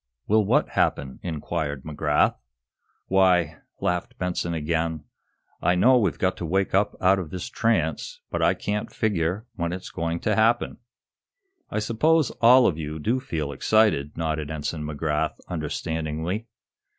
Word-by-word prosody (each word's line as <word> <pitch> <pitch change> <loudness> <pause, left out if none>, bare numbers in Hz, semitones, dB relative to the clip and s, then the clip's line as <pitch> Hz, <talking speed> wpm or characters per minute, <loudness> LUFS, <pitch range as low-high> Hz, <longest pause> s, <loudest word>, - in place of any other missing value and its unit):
"Will 110 +1 +3
what - - +2
happen?" 65 -1 0
inquired 75 -4 -3
McGrath. 75 -1 +1 0.7
"Why," 90 -4 +3 0.2
laughed 120 +8 -2
Benson 90 -2 -2
again, 80 0 -1 0.6
"I 90 - +3
know 125 +8 +5
we've 100 -7 0
got 95 -1 +1
to 90 - -4
wake 95 +3 0
up 100 +2 +2
out 95 +1 +4
of 85 -5 -5
this 90 +2 -5
trance, 85 -10 0
but - - -1
I - - +3
can't 105 0 -3
figure 95 0 -1
when 85 -1 -1
it's 90 +1 -6
going 85 +1 -2
to 105 - +1
happen." 115 +3 +2 0.9
"I - - -3
suppose 140 +8 +2
all 125 +2 +7
of 80 -3 +1
you 75 0 -4
do 115 +11 0
feel 80 - -3
excited," 75 -2 +2
nodded 80 -2 -2
Ensign 75 0 -4
McGrath, 75 0 -1 0.2
understandingly. 80 +4 -3
85 Hz, 145 wpm, -25 LUFS, 80-105 Hz, 0.9 s, all